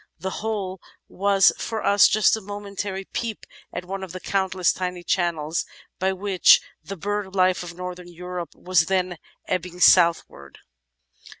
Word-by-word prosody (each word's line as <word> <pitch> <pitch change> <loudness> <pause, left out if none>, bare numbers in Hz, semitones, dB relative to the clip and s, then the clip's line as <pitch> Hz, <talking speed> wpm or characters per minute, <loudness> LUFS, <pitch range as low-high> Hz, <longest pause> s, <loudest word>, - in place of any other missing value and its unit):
The 190 +3 -4
whole 200 -4 -3 0.3
was 195 -1 +3
for 225 -2 -4
us 200 0 +6
just 215 +1 +3
a 220 - -7
momentary 200 -1 -5
peep 230 -3 -4 0.3
at 180 - -6
one 190 +1 -5
of 185 -2 -8
the 185 - -6
countless 190 -2 0
tiny 180 -1 -4
channels 165 -3 0 0.4
by 190 +1 +1
which 190 -1 +5 0.2
the 195 - -7
bird 200 +1 -3
life 185 -1 +3
of 175 -1 -8
northern 180 0 -7
Europe 180 0 -7
was 180 -3 +1
then 185 -3 -1 0.3
ebbing 180 0 -3
southward. 170 - +3
185 Hz, 145 wpm, -24 LUFS, 180-195 Hz, 0.4 s, us